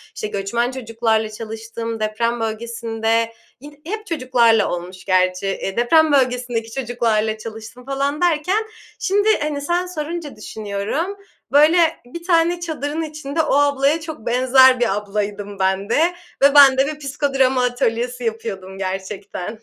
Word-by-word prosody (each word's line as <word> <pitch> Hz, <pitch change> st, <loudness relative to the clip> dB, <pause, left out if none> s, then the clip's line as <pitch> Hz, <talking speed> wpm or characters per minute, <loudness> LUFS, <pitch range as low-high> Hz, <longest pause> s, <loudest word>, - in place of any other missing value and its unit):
işte, 215 Hz, -, -3 dB
göçmen 210 Hz, +5 st, -1 dB
çocuklarla 225 Hz, -3 st, -1 dB
çalıştım, 225 Hz, +1 st, -6 dB
deprem 230 Hz, +2 st, -1 dB
bölgesinde, 225 Hz, 0 st, -1 dB, 0.3 s
yin 290 Hz, +2 st, -14 dB
hep 430 Hz, +5 st, -5 dB
çocuklarla 250 Hz, -, +3 dB
olmuş 180 Hz, +2 st, -6 dB
gerçi. 185 Hz, 0 st, +1 dB
Eee, 195 Hz, +1 st, -3 dB
deprem 315 Hz, +6 st, +4 dB
bölgesindeki 245 Hz, -4 st, 0 dB
çocuklarla 225 Hz, -4 st, 0 dB
çalıştım 225 Hz, +3 st, -10 dB
falan 275 Hz, +3 st, -2 dB
derken 355 Hz, +5 st, +2 dB, 0.4 s
şimdi, 410 Hz, +3 st, +2 dB
hani, 295 Hz, -1 st, -2 dB
sen 345 Hz, +5 st, 0 dB
sorunca 330 Hz, -3 st, -5 dB
düşünüyorum, 215 Hz, -, -4 dB, 0.3 s
böyle, 300 Hz, +5 st, +6 dB, 0.3 s
bir 335 Hz, +8 st, -9 dB
tane 340 Hz, 0 st, +2 dB
çadırın 315 Hz, -2 st, -3 dB
içinde 305 Hz, -1 st, -3 dB
o 310 Hz, -, 0 dB
ablaya 285 Hz, +1 st, +2 dB
çok 315 Hz, -8 st, -8 dB
benzer 255 Hz, +1 st, +5 dB
bir 230 Hz, -5 st, +1 dB
ablaydım 205 Hz, -1 st, -4 dB
ben 190 Hz, +1 st, 0 dB
de -, -, +2 dB, 0.5 s
ve 280 Hz, +1 st, +5 dB
ben 275 Hz, -2 st, +8 dB
de 270 Hz, +1 st, +3 dB
bir 300 Hz, 0 st, -5 dB
psikodrama 270 Hz, -2 st, +1 dB
atölyesi 245 Hz, 0 st, -1 dB
yapıyordum 205 Hz, -4 st, -4 dB
gerçekten. 195 Hz, +2 st, -5 dB
245 Hz, 135 wpm, -20 LUFS, 220-290 Hz, 0.5 s, ben